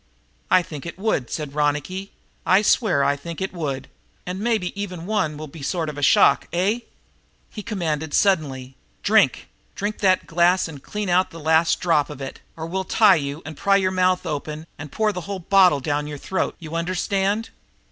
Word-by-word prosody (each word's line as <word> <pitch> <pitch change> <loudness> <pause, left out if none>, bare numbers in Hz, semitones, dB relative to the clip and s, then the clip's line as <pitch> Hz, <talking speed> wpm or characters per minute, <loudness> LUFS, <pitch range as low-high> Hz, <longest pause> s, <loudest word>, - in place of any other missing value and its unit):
"I 185 - +5
think 150 -1 -8
it 170 - -7
would," 190 - -1
said 150 -3 -4
Ronicky. 150 +6 -1 0.3
"I 190 +3 +4
swear 200 - +3
I 140 +1 +2
think 165 +3 -8
it 190 0 -3
would. 145 -6 -4 0.4
And 180 +1 -4
maybe 215 -4 0
even 180 -4 -6
one 180 -8 -1
will 155 - -6
be 155 +2 -12
a - - -9
sort 165 +1 -1
of 150 - -7
a - - -5
shock, 195 +8 +5
eh?" 195 +7 +1 0.7
He 210 - -7
commanded 160 -8 -3
suddenly: 135 -9 +1 0.3
"Drink! - - +3 0.3
Drink 205 +2 -3
that 185 -2 +3
glass 175 +2 +3
and 150 -4 -10
clean 210 +5 -4
out 180 +1 +3
the 165 - -10
last 160 +1 +3
drop 165 -5 +2
of 150 -2 -8
it, 135 -1 -7 0.2
or 160 - -5
we'll 190 +3 -2
tie 210 +1 +5
you 145 -1 -2
and 155 0 -7
pry 200 +6 +2
your 190 -1 +2
mouth 185 0 +1
open 150 +1 -4
and 145 -1 -9
pour 215 -1 +1
the 180 - -4
whole 200 - -2
bottle 180 -4 +4
down 145 +1 -1
your 150 -1 -6
throat. 190 +6 -2
You 160 -2 -9
understand?" 195 +5 -1
170 Hz, 195 wpm, -23 LUFS, 150-190 Hz, 0.7 s, I